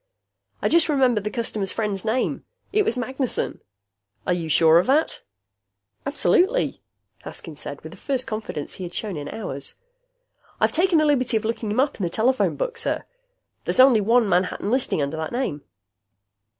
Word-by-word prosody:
"I - - +4
just 335 -1 +4
remembered 255 -8 +2
the - - 0
customer's 215 -4 -2
friend's 205 -4 -2
name. 230 +4 -1 0.3
It 425 - +4
was 245 - -1
Magnessen." 260 +1 -2 0.6
"Are 180 - +2
you 170 -2 -3
sure 160 +2 +6
of 180 - 0
that?" 295 +5 +2 0.9
"Absolutely," 390 - +2 0.4
Haskins - - -7
said, - - -6
with - - -9
the - - -12
first 265 -3 -2
confidence 215 -9 -5
he 185 - -8
had 175 -1 -7
shown 210 -4 -3
in 145 -1 -5
hours. 140 -11 -6 0.8
"I've - - +3
taken 350 +1 +3
the 310 - +4
liberty 255 -5 +2
of 220 - -4
looking 225 -1 -2
him 215 +4 0
up 275 +2 +1
in 200 - -4
the 175 - 0
telephone 250 +8 +1
book, - - -3
sir. 455 - -1 0.6
There's - - -1
only 255 -4 +7
one 230 +2 +3
Manhattan 185 +2 0
listing 250 - +1
under 140 +3 -3
that 160 0 -3
name." 240 - -2
230 Hz, 175 wpm, -23 LUFS, 190-270 Hz, 0.9 s, only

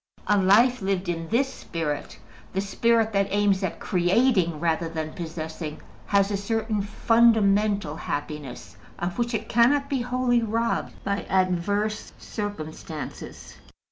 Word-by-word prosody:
A 210 - +3
life 215 +6 +4
lived 190 -2 -1
in 165 -1 -3
this 245 +7 +2
spirit 150 -7 -4 0.4
the 190 - 0
spirit 225 +2 +1
that 195 0 +2
aims 200 -1 +2
at 185 - -3
creating 180 - +2
rather 165 0 0
than 160 -1 -4
possessing 160 -3 -6 0.3
has 200 0 +3
a 200 - 0
certain 220 +1 -1
fundamental 205 -5 +3
happiness, 145 - -6 0.2
of 175 +5 -3
which 235 0 0
it 220 0 -3
cannot 280 +5 +3
be 270 -3 +1
wholly 245 0 +1
robbed 230 +1 -1
by 200 0 -1
adverse 190 +3 0
circumstances. 160 -6 -7
200 Hz, 130 wpm, -25 LUFS, 170-225 Hz, 0.4 s, life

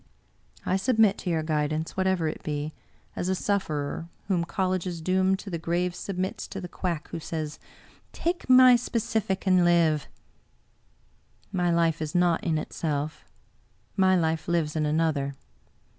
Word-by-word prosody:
I 185 - +2
submit 220 -1 +3
to - - -4
your 160 -2 0
guidance, 155 0 -1
whatever 190 -3 +1
it 155 - -4
be, 150 +1 -3 0.4
as 180 - -2
a 190 - +2
sufferer 165 -5 -2 0.2
whom 175 -3 +1
colleges 185 -1 -1
doom 185 +3 +2
to 195 0 -9
the 170 - -2
grave 175 +2 0
submits 185 0 -4
to 195 - -6
the 180 - -6
quack 170 -3 -4
who 170 - -5
says, 155 -2 -5 0.5
*Take 345 -4 -3
my 255 -1 +8
specific 220 -5 -1
and 185 -2 +4
live!' 165 -4 +3 1.4
My 180 -3 +1
life 165 -2 +2
is 155 +1 -4
naught 175 -2 +3
in 160 -2 +1
itself; 155 -1 -3 0.7
my 190 -1 +4
life 160 -2 0
lives 165 -3 0
in 155 -1 +1
another. 150 -3 0
175 Hz, 145 wpm, -27 LUFS, 155-190 Hz, 1.4 s, my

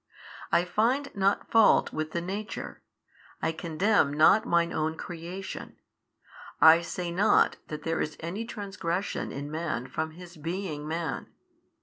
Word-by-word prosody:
I 175 - +3
find 240 +10 0
not 200 0 +1
fault 225 -1 +5
with 155 0 -2
|570 - - -22
the 170 - -1
nature, 200 +5 -5 0.6
I - - 0
condemn 165 +1 +1
not 175 +8 +5
Mine 170 0 +2
Own 160 +1 -1
creation, 180 +3 -7 0.8
I 160 +1 +8
say 175 0 -4
not 195 +5 +3
that 150 - -6
there 165 0 -1
is 155 - -3
any 175 +7 -4
transgression 195 -4 -3
in 145 +2 -6
man 155 -6 -2
from 160 +4 -4
his 175 -1 -11
being 160 -2 -4
man. 165 +1 -3
170 Hz, 140 wpm, -28 LUFS, 160-195 Hz, 0.8 s, I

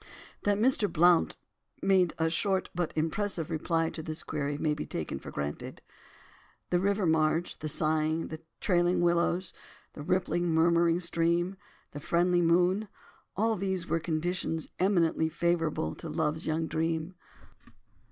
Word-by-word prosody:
That 205 -1 +3
Mr. 225 -2 +2
Blount 175 +1 +4 0.4
made 185 -3 +3
a 160 - +1
short 190 +3 0
but 175 -2 -1
impressive 165 +1 -1
reply 165 +1 0
to 160 - -6
this 155 +1 -5
query 145 -1 -3
may 150 0 0
be 150 - -4
taken - - -4
for - - -9
granted. 70 0 -5 0.9
The 175 - +3
river 200 +1 +1
marge, 160 +1 +1
the 155 - -3
sighing, 155 +1 0 0.2
trailing 175 -1 +2
willows, 175 +1 +1 0.4
the - - -8
rippling 175 +1 0
murmuring 170 +1 +3
stream, 170 +2 +1 0.4
the 145 - -7
friendly 175 +4 +2
moon, 180 +5 +3 0.5
all 225 +2 +2
these 190 -2 -2
were 165 - 0
conditions 165 0 -2
eminently 170 -4 +2
favourable 165 - 0
to 165 - -8
"love's 155 0 -1
young 160 +1 0
dream." 160 +2 -2
170 Hz, 135 wpm, -29 LUFS, 160-180 Hz, 0.9 s, Blount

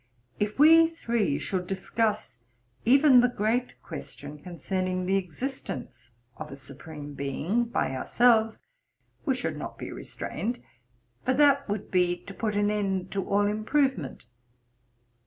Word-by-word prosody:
If 210 0 -1
we 325 +3 +8
three 235 - -1
should 180 -2 -3
discuss 210 - -1 0.5
even 265 +1 +7
the 245 - +3
great 240 +2 -1
question 145 -2 -8
concerning 185 +2 -3
the 190 +2 +2
existence 180 - -5 0.3
of 155 -1 -7
a - - -6
Supreme 145 +2 -8
Being 145 - -1
by 230 - -1
ourselves, 225 - +3 0.7
we 270 -4 +2
should 250 - -3
not - - -6
be - - -6
restrained; 240 +3 -4 0.6
for 255 - +1
that 280 -2 +4
would 205 0 -3
be 180 -1 +2
to 200 - -9
put 215 0 -2
an 205 0 +2
end 195 -3 -1
to 195 -1 -1
all 205 +1 +3
improvement. 215 - 0
205 Hz, 135 wpm, -27 LUFS, 175-245 Hz, 0.7 s, we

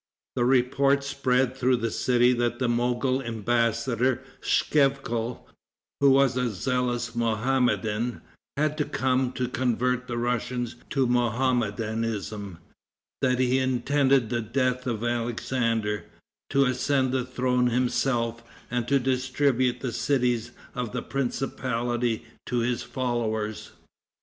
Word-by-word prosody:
The 120 - +2
report 135 +2 +3
spread 130 -2 +1
through 130 -1 +2
the 115 -2 -2
city 125 0 +3
that 120 0 0
the 125 - 0
Mogol 125 +2 +1
embassador, 115 +2 0 0.2
Schevkal, 135 -5 +1 0.5
who 140 - +5
was 135 -2 +4
a 125 -1 +1
zealous 120 +2 -1
Mohammedan, 120 0 0 0.4
had 150 0 0
come 130 0 +1
to 125 - -1
convert 125 0 0
the 120 - -3
Russians 120 0 -2
to 135 -2 +1
Mohammedanism, 115 -5 -1 0.6
that 125 -1 +2
he 130 +1 +2
intended 130 -1 +2
the 120 -1 0
death 125 +2 -1
of 115 -2 -2
Alexander, 115 -2 -1 0.4
to 140 0 +3
ascend 130 +1 +1
the 130 -1 0
throne 125 0 +1
himself, 120 -1 0 0.3
and 120 -1 -1
to 140 - +4
distribute 130 0 +1
the 125 -3 -3
cities 125 -4 +1 0.2
of 125 -4 -4
the - - -3
principality 120 -3 -2 0.2
to 125 - -1
his 120 +1 0
followers. 120 -3 -2
125 Hz, 115 wpm, -26 LUFS, 115-130 Hz, 0.6 s, who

